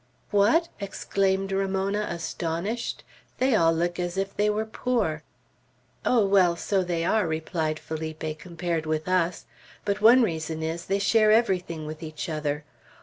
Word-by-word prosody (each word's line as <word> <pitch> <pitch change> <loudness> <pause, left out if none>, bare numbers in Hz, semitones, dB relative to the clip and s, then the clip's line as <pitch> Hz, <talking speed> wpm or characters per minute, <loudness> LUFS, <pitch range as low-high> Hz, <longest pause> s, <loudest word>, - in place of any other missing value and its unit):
"What!" 220 +12 +4
exclaimed 195 -1 -1
Ramona, 195 +2 0
astonished. 170 +6 -3 0.3
"They 260 0 +2
all 165 -6 +4
look 175 +2 -1
as 175 +1 -2
if 195 0 -2
they 210 +1 +2
were 215 +1 0
poor." 220 -8 -1 0.8
"Oh, 235 -5 +3
well, 190 -3 +4
so 195 +2 0
they 170 -2 -1
are," 210 -1 +2
replied 160 0 -2
Felipe, 155 -1 -5
"compared 170 -1 -3
with 155 +1 -1
us; 180 -1 +1 0.4
but 205 0 -1
one 240 +4 +7
reason 160 -4 -2
is, 165 +1 -3
they 195 - +1
share 215 +1 +4
everything 180 -8 +1
with 155 0 -7
each 155 +2 -5
other. 150 -1 -2
180 Hz, 145 wpm, -26 LUFS, 160-205 Hz, 0.8 s, one